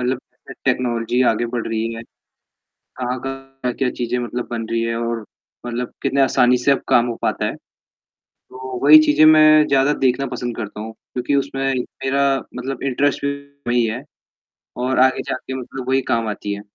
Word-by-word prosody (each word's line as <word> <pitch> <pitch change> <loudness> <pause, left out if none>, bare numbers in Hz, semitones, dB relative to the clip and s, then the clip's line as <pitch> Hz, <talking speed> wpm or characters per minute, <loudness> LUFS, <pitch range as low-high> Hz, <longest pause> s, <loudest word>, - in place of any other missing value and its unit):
मतलब 125 +1 0 0.3
अ, - - -5
टेक्नोलॉजी 120 0 +1
आगे 120 +2 -2
बढ़ 120 -1 -3
रही 115 0 -2
है। 115 - -7 0.8
कहाँ-कहाँ 135 +2 -6
क्या-क्या 125 +1 -1
चीजें 125 0 -2
मतलब 120 0 -4
बन 115 -2 -3
रही 115 0 0
हैं 115 0 -1
और 115 -1 -3 0.4
मतलब 120 0 -4
कितने 140 - +1
आसानी 125 -1 +4
से 125 +3 +1
अब 135 - -1
काम 120 0 +4
हो 120 -1 -3
पाता - - 0
है। - - -3 0.8
तो 130 0 -9
वही 150 +2 +10
चीज़ें 150 0 +5
मैं 155 -1 +7
ज़्यादा 140 +1 +3
देखना 130 +2 +2
पसंद 120 -2 -4
करता 105 -2 -6
हूँ 110 +1 -6 0.2
क्योंकि 125 +3 -1
उसमें 135 -1 -1 0.4
मेरा 140 +1 +2 0.3
मतलब 130 +1 -5
इंटरेस्ट 140 +2 0
भी 140 - +1 0.4
वही 120 -1 +2
है, 115 +4 -3 0.7
और 125 +1 -1
आगे 130 0 +3
जाके 130 0 -5
मतलब 130 0 -7
वही 135 +1 +3
काम 115 -1 +1
आती 105 -1 -4
है। 100 - -7
125 Hz, 175 wpm, -20 LUFS, 120-135 Hz, 0.8 s, वही